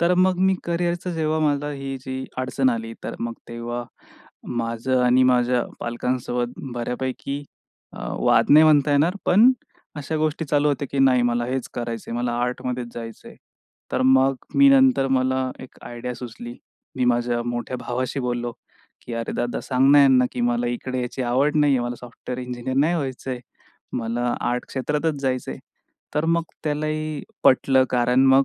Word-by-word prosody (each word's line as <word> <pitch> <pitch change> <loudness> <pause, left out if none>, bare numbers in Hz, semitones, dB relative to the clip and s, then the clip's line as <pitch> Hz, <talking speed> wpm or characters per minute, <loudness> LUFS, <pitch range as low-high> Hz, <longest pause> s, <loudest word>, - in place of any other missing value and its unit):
तर 170 +1 +3
मग 185 0 +3
मी 190 +1 +3
करिअरचं 175 +1 -1
जेव्हा 160 -1 0
मला 145 -1 +1
ही 135 -1 -5
जी 130 0 -5
अडचण 130 +1 +1
आली, 115 -1 -3
तर - - -4
मग 115 0 -2 0.2
तेव्हा 120 +1 -4 0.7
माझं 115 +2 0
आणि 125 +1 +5
माझ्या 125 -1 +3 0.2
पालकांसोबत 120 0 -2 0.2
बऱ्यापैकी 130 +3 -3 0.5
अ, - - -9 0.2
वाद - - +3
नाही 155 +2 +8
म्हणता 150 -2 +4
येणार. 155 +6 +3
पण 220 +8 +7 0.5
अशा 150 +2 -3
गोष्टी 155 +1 -1
चालू 145 +1 +2
होत्या, 140 0 -1
की 140 - -2
नाही 130 -2 +5
मला 120 0 +1
हेच 130 0 -3
करायचं 115 -2 -5
आहे. 115 - -3
मला 120 0 -1
आर्टमध्येच 125 0 -3
जायचं 115 -1 -8
आहे. - - -14 0.6
तर - - +1
मग 130 +1 +4 0.2
मी 280 0 +7
नंतर 265 - +5
मला 130 0 0
एक 130 - -12
आयडिया 120 +1 -6
सुचली. 120 0 -8 0.4
मी 130 - +1
माझ्या 120 0 +1
मोठ्या 120 +1 -3
भावाशी 130 +3 -3
बोललो 120 -1 -2 0.5
की, 120 - -6
"अरे, 115 0 -3
दादा 120 0 -2
सांग 130 +1 +3
ना 145 - +8
यांना, 130 -2 +5
की 125 - -4
मला 120 0 +1
इकडे 130 +1 -3
यायची 125 +1 -3
आवड 135 +5 +1
नाही 145 -2 +4
आहे. - - 0
मला 120 0 -3
सॉफ्टवेअर 125 +1 -7
इंजिनिअर 125 +1 -4
नाही 155 +5 +3
व्हायचंय. 130 -4 -4 0.6
मला 120 +1 -1 0.2
आर्ट 125 0 -2
क्षेत्रातच 150 +2 -1
जायचं 130 -2 -1
आहे." 65 - -9 0.6
तर 150 +1 +1
मग 165 +1 +2 0.2
त्यालाही 155 0 -2 0.2
पटलं 130 0 +5
कारण 125 +1 +3
मग 135 +1 +6
130 Hz, 170 wpm, -23 LUFS, 120-145 Hz, 0.7 s, नाही